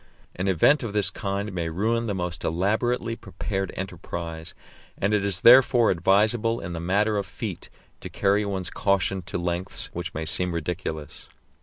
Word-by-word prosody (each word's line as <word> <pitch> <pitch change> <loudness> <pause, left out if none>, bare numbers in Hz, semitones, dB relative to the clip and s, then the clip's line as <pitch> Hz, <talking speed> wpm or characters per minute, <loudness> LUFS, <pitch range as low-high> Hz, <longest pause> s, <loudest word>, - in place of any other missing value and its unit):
An 90 +2 -2
event 95 - +4
of 115 -5 -4
this 100 -2 +1
kind 100 +1 -3
may 85 -2 -2
ruin 115 +7 0
the 100 - -1
most 90 -3 -4
elaborately 110 +7 0
prepared 95 -4 -4
enterprise, 85 -3 -6 0.4
and 100 +2 0
it 105 -1 +2
is 100 -2 +4
therefore 120 -1 +7
advisable 105 +6 +2
in 85 - -6
the 85 - -4
matter 105 +5 +1
of 100 - -2
feet - - -6 0.3
to - - -8
carry 100 +1 +1
one's 95 -3 -3
caution 100 -1 0
to 95 +3 -5
lengths 90 +1 -3
which 85 0 -5
may 80 +1 -3
seem 90 +2 -1
ridiculous. 80 -3 -5
95 Hz, 165 wpm, -25 LUFS, 85-105 Hz, 0.4 s, therefore